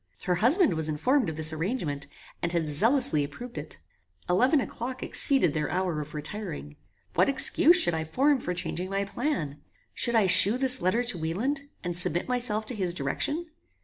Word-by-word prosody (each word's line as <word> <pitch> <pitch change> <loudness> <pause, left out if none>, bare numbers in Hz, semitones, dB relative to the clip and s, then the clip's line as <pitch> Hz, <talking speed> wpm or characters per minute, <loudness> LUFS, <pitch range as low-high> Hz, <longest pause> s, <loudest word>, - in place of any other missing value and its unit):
Her 180 - 0
husband 265 - +3
was 160 -1 -2
informed 250 - 0
of 160 - -6
this 160 0 +1
arrangement, 160 - -4 0.3
and 170 - -1
had 165 -2 -1
zealously 180 - +3
approved 235 - -9
it. - - -9 0.5
Eleven 250 - +2
o'clock 255 0 -6
exceeded 270 - +1
their 150 -1 -2
hour 180 -3 -2
of 150 +1 -10
retiring. 150 - -7 0.4
What - - +2
excuse 335 +5 +5
should 175 - +4
I 160 0 -2
form 270 - +1
for 180 -5 -5
changing 180 +1 -4
my 195 0 -2
plan? 195 - -4 0.3
Should 235 -1 0
I 220 -3 +4
shew 190 +5 +6
this 260 0 +4
letter 220 +7 0
to 235 -8 -2
Wieland, 255 - -3
and 175 -1 -4
submit 175 0 +2
myself 240 -4 -1
to 245 - -6
his 180 -4 -3
direction? 290 - -4
190 Hz, 180 wpm, -26 LUFS, 160-255 Hz, 0.5 s, shew